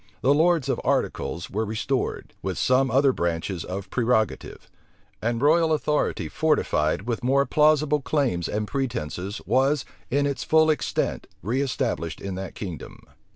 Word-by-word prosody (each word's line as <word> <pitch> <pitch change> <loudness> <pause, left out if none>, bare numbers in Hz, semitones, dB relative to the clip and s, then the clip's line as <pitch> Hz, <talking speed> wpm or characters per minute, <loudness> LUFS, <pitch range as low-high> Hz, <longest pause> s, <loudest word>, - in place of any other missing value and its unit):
The 135 - +4
lords 165 -1 +3
of - - -1
articles 85 - -1
were 110 +3 -1
restored, 110 +5 -2
with - - -3
some 130 +1 +3
other 135 +3 +4
branches 85 0 -2
of 95 +1 -6
prerogative; 115 -3 0 0.5
and 115 +1 0
royal 160 +4 +4
authority 150 -1 0
fortified 100 - +1
with 120 +1 -3
more 135 +2 +3
plausible 150 +1 +3
claims 130 - 0
and 105 0 -2
pretences, 105 - -3
was, 135 +5 +2 0.2
in 140 +3 +1
its 140 -3 -2
full 160 0 +4
extent, 150 - -2 0.2
reestablished 125 - -1
in 100 -1 -5
that 95 0 -6
kingdom. 90 -7 -7
125 Hz, 140 wpm, -25 LUFS, 100-145 Hz, 0.5 s, The